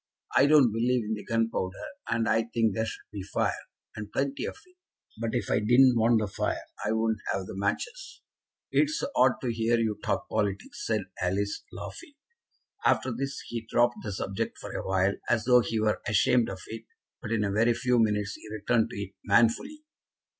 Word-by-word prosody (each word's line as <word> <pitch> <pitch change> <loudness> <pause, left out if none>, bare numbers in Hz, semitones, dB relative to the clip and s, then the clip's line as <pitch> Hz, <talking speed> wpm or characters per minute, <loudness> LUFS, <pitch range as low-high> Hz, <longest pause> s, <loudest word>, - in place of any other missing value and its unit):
I 135 +2 +6
don't 145 -6 +6
believe 120 +2 +1
in 110 +1 -2
the 105 - -5
gunpowder, 115 -5 -1 0.3
and 115 0 +1
I 115 - +3
think 115 -2 +1
there 110 +3 -1
should - - -7
be 105 -2 -5
fire, 95 - -2 0.3
and 105 -1 -7
plenty 140 0 -1
of - - -6
it; 365 0 -25 0.4
but 115 -1 -2
if - - -1
I - - +3
didn't 125 +4 +6
want 115 0 +4
the 105 - -1
fire 95 - -2 0.2
I 105 - 0
wouldn't 110 -1 +1
have 95 - -2
the - - -8
matches." 465 - -3 0.5
"It's 305 +2 +2
so - - -2
odd 130 -1 +5
to 120 -2 0
hear 115 +1 +2
you 110 -2 -1
talk - - -1
politics," 100 -2 -2
said 110 -2 +1 0.2
Alice, 100 +3 -1
laughing. 300 -5 -9 0.7
After 130 - +2
this 135 +4 -4
he 120 -1 -4
dropped 120 0 +3
the 105 - -4
subject 95 0 -3
for - - -8
a - - -4
while, 95 +1 +2 0.2
as 115 -3 +2
though 125 0 +6
he 115 -1 -2
were 110 0 +1
ashamed 115 +3 +3
of 95 - -7
it, 115 0 -8 0.4
but 110 - -6
in 110 -2 +1
a 100 - 0
very 115 +3 +3
few 125 0 +2
minutes 105 -2 +1
he 110 - -11
returned 110 +2 +1
to - - -8
it 100 -1 -5
manfully. 120 - +2
115 Hz, 195 wpm, -28 LUFS, 105-120 Hz, 0.7 s, I